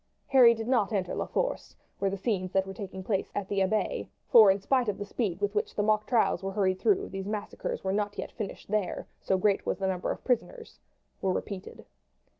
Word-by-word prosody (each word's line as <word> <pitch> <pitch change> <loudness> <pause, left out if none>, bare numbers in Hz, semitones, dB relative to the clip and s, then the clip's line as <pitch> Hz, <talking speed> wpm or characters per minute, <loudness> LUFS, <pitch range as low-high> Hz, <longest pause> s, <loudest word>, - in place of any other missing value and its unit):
Harry 245 -4 +7
did 225 0 -5
not 235 -6 +2
enter 190 -4 -1
La - - -2
Force, - - -2 0.2
where 195 - +1
the 195 - -3
scenes 190 -3 -1
that 190 0 +2
were 195 - -7
taking 190 -3 -7
place 195 0 -1
at 205 -2 -2
the 200 -1 -1
Abbaye 215 - 0 0.2
for, 220 -4 +9
in 195 +1 +3
spite 250 +3 +1
of 200 - -2
the 205 - -5
speed 200 -4 -2
with 205 0 -1
which 210 - -1
the 205 - +1
mock 215 0 +2
trials 230 -7 +2
were 195 0 -3
hurried 190 -2 +1
through, 395 - +2
these 195 0 -5
massacres 210 -1 -4
were 190 0 0
not 205 0 -1
yet - - -5
finished 210 -5 -6
there, 210 -3 -1 0.2
so 190 - +1
great 200 +1 +2
was - - -1
the 195 - -2
number 185 -1 -2
of - - -4
prisoners 450 - -2 0.4
were 190 - +1
repeated. 190 0 -5
205 Hz, 225 wpm, -29 LUFS, 190-220 Hz, 0.4 s, for